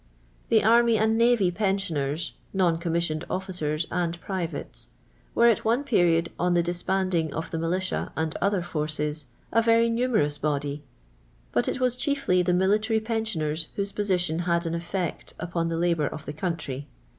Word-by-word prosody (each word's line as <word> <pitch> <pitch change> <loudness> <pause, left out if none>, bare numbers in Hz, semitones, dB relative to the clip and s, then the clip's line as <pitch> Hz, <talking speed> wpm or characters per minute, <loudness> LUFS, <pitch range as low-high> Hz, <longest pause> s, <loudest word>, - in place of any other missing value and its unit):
The - - +4
array 230 +1 +5
and 220 +1 +2
navj' 230 -7 +4
pensioners 170 -6 -1 0.2
(non 175 -4 +2
commis 170 0 0
sioned 155 0 -3
ofHcers 175 -4 -2
and 170 -1 -1
privates) 180 -2 -4 0.5
were, 235 - +5
at 235 -3 +4
one 235 +5 +2
period, 170 -9 +3
on 180 0 +2
Xha 170 - +3
disbanding 175 -1 0
of 160 - -4
the 165 - -2
ipilitia 180 +3 -1
and 160 0 -1
other 200 -2 +1
forces, 150 -2 -2 0.2
a 230 - +4
verj' 230 0 +4
numerous 230 -12 +1
body, 145 -1 -1 0.7
but 120 - +1
it - - -1
was 250 -1 +2
chiefly 275 - +1
the 180 0 +1
miliUiry 210 +5 +2
pensioners 170 -9 -1
whose 200 0 -2
position 180 -5 0
had 170 0 +1
an 165 - -2
effect 170 0 -3
upon 170 0 -2
the 165 - -1
Ubonr 165 -3 +1
of 155 -1 -8
the 145 - -5
country'. 150 -4 -4
175 Hz, 160 wpm, -26 LUFS, 160-210 Hz, 0.7 s, array